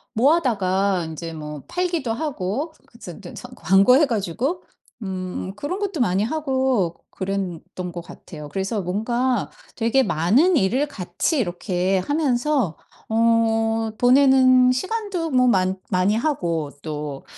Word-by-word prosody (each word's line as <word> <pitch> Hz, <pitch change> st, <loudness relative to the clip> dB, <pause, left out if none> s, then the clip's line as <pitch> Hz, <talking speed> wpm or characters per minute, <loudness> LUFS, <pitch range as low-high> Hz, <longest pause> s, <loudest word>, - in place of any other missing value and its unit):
모아다가 200 Hz, -, +2 dB
인제 165 Hz, +1 st, -6 dB
뭐 150 Hz, -2 st, -7 dB
팔기도 340 Hz, -9 st, -1 dB
하고 275 Hz, -, -3 dB
그 -, -, -19 dB
즈 -, -, -10 dB
스 -, -, -9 dB
서 -, -, -9 dB
광고해 250 Hz, +10 st, +4 dB
가지고 240 Hz, -, -2 dB, 0.4 s
음 185 Hz, -1 st, -5 dB
그런 290 Hz, -, -4 dB
것도 400 Hz, -6 st, -3 dB
많이 195 Hz, -3 st, +2 dB
하고 260 Hz, -, 0 dB, 0.2 s
그랬던 185 Hz, -2 st, -4 dB
것 175 Hz, 0 st, -6 dB
같아요. 150 Hz, -3 st, -11 dB
그래서 195 Hz, +5 st, -2 dB
뭔가 235 Hz, +6 st, -1 dB, 0.2 s
되게 235 Hz, +3 st, +2 dB
많은 255 Hz, -, +3 dB
일을 255 Hz, +10 st, +1 dB
같이 190 Hz, -, -2 dB
이렇게 185 Hz, -2 st, 0 dB
하면서 270 Hz, -, 0 dB, 0.3 s
어, 225 Hz, 0 st, +2 dB
보내는 255 Hz, 0 st, +5 dB
시간도 375 Hz, -, -2 dB
뭐 255 Hz, -3 st, +3 dB
많 190 Hz, -3 st, +2 dB
많이 185 Hz, +3 st, +2 dB
하고 170 Hz, -, -1 dB
또 150 Hz, -3 st, -5 dB
225 Hz, 245 characters per minute, -22 LUFS, 185-270 Hz, 0.4 s, 보내는